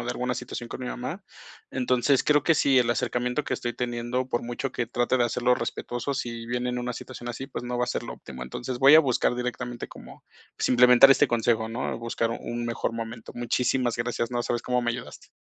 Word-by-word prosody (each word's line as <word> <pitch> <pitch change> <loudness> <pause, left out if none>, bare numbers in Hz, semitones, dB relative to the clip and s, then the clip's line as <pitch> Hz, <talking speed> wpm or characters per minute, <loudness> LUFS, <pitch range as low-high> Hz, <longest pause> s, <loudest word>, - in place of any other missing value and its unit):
o - - -5
de - - -2
alguna 125 0 -2
situación 120 -1 -6
con 130 - -7
mi 125 - -4
mamá, 130 +11 -5 0.5
entonces 130 +1 +2
creo 150 -2 +4
que 165 -3 +3
si 135 -2 +4
el 120 - +1
acercamiento 125 +3 -1
que - - -1
estoy 120 -1 -3
teniendo, 120 +1 -2
por 120 - -1
mucho 120 +2 -4
que 120 - -2
trate 120 +1 +1
de 120 - +2
hacerlo 120 +1 +2
respetuoso, 120 +3 -3
si 115 -3 -4
viene 125 +1 -1
en 125 - -2
una 125 0 -3
situación 120 0 -8
así, 130 +3 -5
pues 130 - -6
no 120 0 -3
va 125 - +2
a - - -10
ser 120 - -2
lo 120 - -6
óptimo, 65 -2 -10
entonces 120 - -5
voy 140 +3 +9
a - - +9
buscar 125 -3 +1
directamente 125 0 -4
como, - - -13 0.3
pues - - 0
implementar 125 +2 +8
este - - +3
consejo, 115 -1 +1
¿no?, 115 +1 -3
buscar 115 0 -1
un 120 0 -4
mejor 115 -1 -2
momento. 115 0 -6
Muchísimas 120 0 0
gracias. 120 0 -2
No 120 0 0
sabes 120 0 -2
cómo 125 -1 0
me 120 - +1
ayudaste. 120 +1 -7
120 Hz, 225 wpm, -26 LUFS, 120-125 Hz, 0.5 s, voy